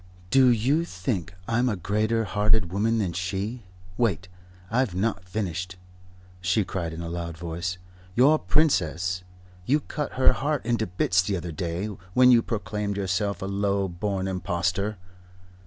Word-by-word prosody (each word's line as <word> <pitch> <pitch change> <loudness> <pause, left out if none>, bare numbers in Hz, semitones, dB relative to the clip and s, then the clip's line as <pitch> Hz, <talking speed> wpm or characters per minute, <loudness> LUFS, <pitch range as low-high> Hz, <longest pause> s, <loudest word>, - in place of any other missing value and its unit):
"Do 135 +1 +6
you 130 +8 +3
think 90 - -3 0.2
I'm 120 +2 +2
a 105 - 0
greater 110 +5 0
hearted 105 -2 +2
woman 110 +3 +2
than 95 -6 0
she? 100 +6 -3 0.3
Wait, 95 -7 +1 0.4
I've 120 -5 +1
not 95 -2 -1
finished," 90 -2 -3 0.6
she 90 +3 +1
cried 85 -3 -3
in 80 +1 -6
a 85 - -4
loud 85 -1 -4
voice. 85 +2 -3 0.4
"Your 145 +6 +5
Princess 90 - +1 0.5
you 145 +4 +4
cut 150 0 -4
her 130 - +5
heart 145 -2 -1
into 115 -2 +1
bits 90 +1 +2
the 95 +1 -1
other 85 0 -5
day, 85 +3 -3 0.3
when 125 0 +7
you 120 -2 +7
proclaimed 105 -2 -3
yourself 100 0 -1
a - - -2
low 100 0 0
born 95 +2 -2
impostor. 95 +2 -1
100 Hz, 150 wpm, -26 LUFS, 90-115 Hz, 0.6 s, when